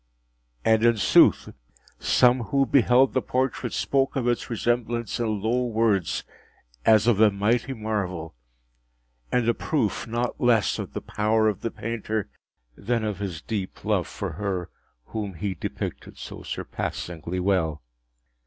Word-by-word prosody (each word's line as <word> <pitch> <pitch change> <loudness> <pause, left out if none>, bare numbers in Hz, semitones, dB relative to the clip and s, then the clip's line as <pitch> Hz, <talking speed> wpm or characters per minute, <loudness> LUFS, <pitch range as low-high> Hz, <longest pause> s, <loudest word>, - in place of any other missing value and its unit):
And 110 0 +4
in 115 -1 +4
sooth 100 - +5 0.5
some 125 0 +4
who 135 +6 +2
beheld 130 -1 +4
the 130 - +2
portrait 130 +1 -1
spoke 135 -1 0
of 125 -3 0
its 120 -1 0
resemblance 120 -1 -1
in 110 -4 -1
low 125 +3 +1
words, 110 -8 +1 0.6
as 110 -1 +6
of 115 -4 +3
a 110 -1 +7
mighty 115 +6 0
marvel, 95 -7 -3 1.0
and 125 -2 +1
a 120 - +4
proof 120 -5 -1
not 120 +1 -2
less 120 -4 +3
of - - -6
the - - -4
power 110 +1 +1
of 105 -3 -1
the 115 - -1
painter 110 -2 -3 0.5
than 115 +2 -1
of 105 -3 -3
his 90 -5 -5
deep 100 -4 -5
love - - +1
for - - -5
her 95 -4 -3 0.3
whom 105 -4 -5
he 95 +3 -2
depicted 85 - -6
so - - -8
surpassingly 85 +1 -4
well. 85 -6 0
110 Hz, 145 wpm, -25 LUFS, 100-120 Hz, 1.0 s, a